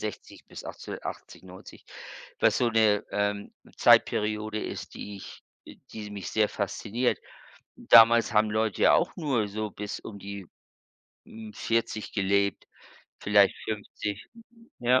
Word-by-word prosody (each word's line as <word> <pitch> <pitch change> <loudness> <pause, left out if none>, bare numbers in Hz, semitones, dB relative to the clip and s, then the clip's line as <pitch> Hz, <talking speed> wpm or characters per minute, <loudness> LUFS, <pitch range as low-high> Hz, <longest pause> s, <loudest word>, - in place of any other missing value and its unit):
1860 105 -2 -7
bis - - -10
1880/90, 95 0 -9 0.6
was - - +3
so 120 - +2
'ne, 110 -2 +3
ähm, 105 0 -2 0.2
Zeitperiode 105 0 +3
ist, - - -7
die 100 -1 -8
ich, 95 - -11 0.2
äh - - -12 0.2
die 105 -1 -7
mich 100 -2 -6
sehr 110 -1 +2
fasziniert. 115 +4 -2 0.6
Damals 115 -1 +6
haben 105 0 +3
Leute 110 -1 -1
ja - - +6
auch - - +2
nur 130 -10 0
so 105 +1 -4
bis 105 0 -6
um 100 -2 -9
die, 100 -1 -8 0.8
hm, 110 -1 -11
40 115 -1 -2
gelebt, 100 0 0 0.5
vielleicht 100 -1 +4
50. 105 -1 -5 0.5
Ja. 125 +1 +4
105 Hz, 130 wpm, -27 LUFS, 100-110 Hz, 0.8 s, Damals